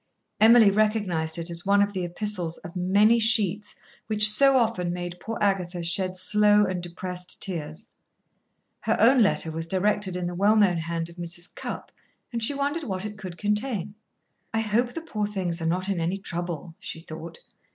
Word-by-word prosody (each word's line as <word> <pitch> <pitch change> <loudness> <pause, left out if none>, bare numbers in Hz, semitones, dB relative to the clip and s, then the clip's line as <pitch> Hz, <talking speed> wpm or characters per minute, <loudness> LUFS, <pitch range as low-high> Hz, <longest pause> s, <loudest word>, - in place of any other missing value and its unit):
Emily 220 -1 +7
recognised 195 -7 0
it 170 +1 -4
as 170 0 0
one 200 +1 +3
of 200 0 +1
the 185 -2 -3
epistles 175 -1 -4
of 170 - -11
many 200 +6 +3
sheets 210 -2 +2 0.3
which 215 -1 +6
so 270 +6 +5
often 220 -8 0
made 175 0 -6
poor 225 +4 -5
Agatha 185 -3 -1
shed 185 +2 0
slow 210 +2 +3
and 185 -2 -3
depressed 180 +1 -6
tears. 170 +3 -5 0.9
Her - - 0
own 250 +2 +5
letter 180 -6 +2
was 165 +1 -2
directed 195 +1 0
in 180 -1 -3
the 175 - -3
well 200 +4 +3
known 200 -5 +3
hand 165 0 -2
of 170 - -14
Mrs. 175 0 -6
Cupp, - - -7 0.4
and 230 - -2
she 280 +5 +2
wondered 285 +4 -2
what 190 -2 -3
it 210 0 -6
could 185 -3 -8
contain. 210 -1 -2 0.6
"I 225 - 0
hope 230 +3 0
the 330 - -5
poor 215 -10 -3
things 180 -5 -3
are 165 - -1
not 180 +3 -1
in 195 -3 -1
any 170 +4 -1
trouble," 175 -3 -5
she - - -6
thought. 165 0 -9
190 Hz, 185 wpm, -25 LUFS, 175-210 Hz, 0.9 s, Emily